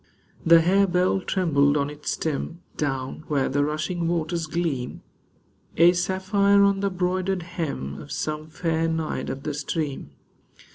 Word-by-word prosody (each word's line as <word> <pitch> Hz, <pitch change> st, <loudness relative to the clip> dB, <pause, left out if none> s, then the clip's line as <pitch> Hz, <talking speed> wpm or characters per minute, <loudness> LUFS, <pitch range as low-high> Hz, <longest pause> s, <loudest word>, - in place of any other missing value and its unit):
The 165 Hz, 0 st, +7 dB
harebell 185 Hz, +1 st, +3 dB
trembled 145 Hz, -6 st, +2 dB
on 140 Hz, 0 st, -1 dB
its 150 Hz, 0 st, -6 dB
stem 165 Hz, +3 st, -3 dB
Down 135 Hz, 0 st, -3 dB
where 140 Hz, -3 st, +1 dB
the 145 Hz, +2 st, +1 dB
rushing 155 Hz, +3 st, -2 dB
waters 165 Hz, -1 st, -1 dB
gleam, 155 Hz, -7 st, -3 dB, 0.7 s
A 170 Hz, +2 st, +7 dB
sapphire 195 Hz, +2 st, +3 dB
on 200 Hz, -1 st, +3 dB
the 200 Hz, 0 st, +1 dB
broidered 185 Hz, 0 st, -1 dB
hem 150 Hz, -, -4 dB
Of 145 Hz, -, -11 dB
some 155 Hz, 0 st, -3 dB
fair 165 Hz, 0 st, -1 dB
Naiad 160 Hz, -1 st, -2 dB
of 135 Hz, -, -5 dB
the 150 Hz, -, -2 dB
stream. 145 Hz, -, -3 dB
165 Hz, 140 wpm, -25 LUFS, 145-180 Hz, 0.7 s, The